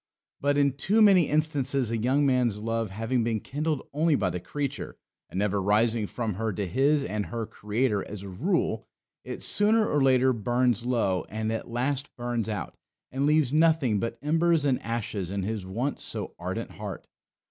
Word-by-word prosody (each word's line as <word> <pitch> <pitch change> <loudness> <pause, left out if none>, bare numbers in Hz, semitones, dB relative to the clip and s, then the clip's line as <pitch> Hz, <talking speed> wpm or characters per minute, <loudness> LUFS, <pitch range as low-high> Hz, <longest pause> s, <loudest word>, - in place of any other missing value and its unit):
But, 145 0 +1
in 140 -1 +4
too 180 - +1
many 195 -7 +6
instances, 140 -5 0
a - - 0
young 130 +6 +2
man's 125 -5 +2
love 115 0 -2
having 115 +5 -1
been 115 -1 0
kindled 150 +4 -3
only 155 +1 +3
by 95 -8 0
the 90 - -3
creature, 140 +10 -4 0.3
and, - - -7
never 100 0 +1
rising 110 +2 +2
from 115 -1 -3
her 110 +4 -2
to 100 +1 -2
his 135 - +2
and 105 -5 -3
her 115 -1 -3
Creator, 105 0 -1
as 100 -1 -7
a - - -7
rule, 145 - -1 0.4
it - - -6
sooner 215 +1 +3
or 145 - +1
later 130 -1 +4
burns 120 +1 +1
low 105 -8 0
and 110 +1 -2
at 115 - -4
last 135 +4 -2
burns 120 -2 -2
out, 105 -6 -4 0.4
and 135 +2 0
leaves 150 -3 +3
nothing 155 -9 +3
but 115 +2 -3
embers 165 0 +2
and 135 -3 +1
ashes 110 -5 -3
in 100 0 -2
his 105 -2 -3
once 120 +9 -2
so - - -4
ardent - - -4
heart. - - -7
120 Hz, 180 wpm, -27 LUFS, 105-145 Hz, 0.4 s, many